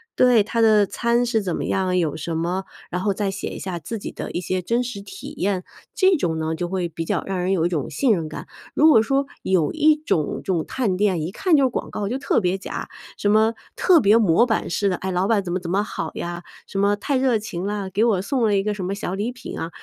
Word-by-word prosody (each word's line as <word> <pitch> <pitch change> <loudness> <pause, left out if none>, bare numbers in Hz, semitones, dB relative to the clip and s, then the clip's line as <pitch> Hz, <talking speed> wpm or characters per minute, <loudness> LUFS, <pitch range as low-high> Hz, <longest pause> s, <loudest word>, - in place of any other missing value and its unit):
对， 245 -4 +5
他 230 +2 -3
的 215 -2 +5
餐 235 +4 +1
是 230 -2 +1
怎 180 -4 -2
么 - - -3
样 190 -1 0
啊， 180 - 0
有 165 -5 0
什 165 +2 -4
么， 175 +4 -1 0.3
然 180 - -2
后 200 +1 +1
再 195 0 -1
写 195 - -5
一 - - -7
下 180 -3 -4
自 195 +8 -5
己 200 - -6
的 - - -6
一 175 - -3
些 185 +1 -2
真 235 +7 0
实 240 -5 -6
体 375 - -9
验， 190 -1 0 0.3
这 375 -2 +4
种 165 - -1
呢 160 0 -1
就 175 +2 -3
会 180 -1 -2
比 165 0 -5
较 - - -1
让 190 -1 -2
人 180 +2 +1
有 170 -3 +1
一 - - +2
种 155 -6 -2
信 240 - +1
任 165 -5 -2
感。 155 - -7 0.3
如 315 - +5
果 225 -8 +7
说 270 +4 0 0.2
有 180 -5 +2
一 310 0 +4
种 230 - -1
这 - - -2
种 165 -3 -1
探 215 -8 -1
店， 190 -4 +1
一 160 +4 -3
看 335 - +2
就 280 - +4
是 260 - +3
广 - - -4
告 200 -1 -3
就 250 - -1
特 270 - +1
别 180 0 0
假， 195 - -6 0.3
什 205 - +1
么 220 +1 +4 0.2
特 355 -4 +5
别 210 +1 +5
模 215 0 +4
板 225 -3 -1
式 200 +3 +1
的， 180 - -1
哎， 190 - -4
老 180 0 +1
板 210 0 +2
怎 175 -3 -4
么 - - +1
怎 175 -1 -5
么 200 +2 +2
好 160 -6 -4
呀， 175 0 -5 0.2
什 - - -6
么 200 +1 +3
太 275 +7 -1
热 255 -3 +2
情 195 -4 -5
啦， 200 -1 -3
给 200 +4 +1
我 215 -6 +2
送 240 +5 -1
了 210 -2 +3
一 - - +2
个 210 +1 -1
什 200 -2 -5
么 190 +2 -2
小 190 -2 -4
礼 215 +5 -2
品 250 - -8
啊， 165 - -4
200 Hz, 295 characters per minute, -22 LUFS, 180-230 Hz, 0.3 s, 果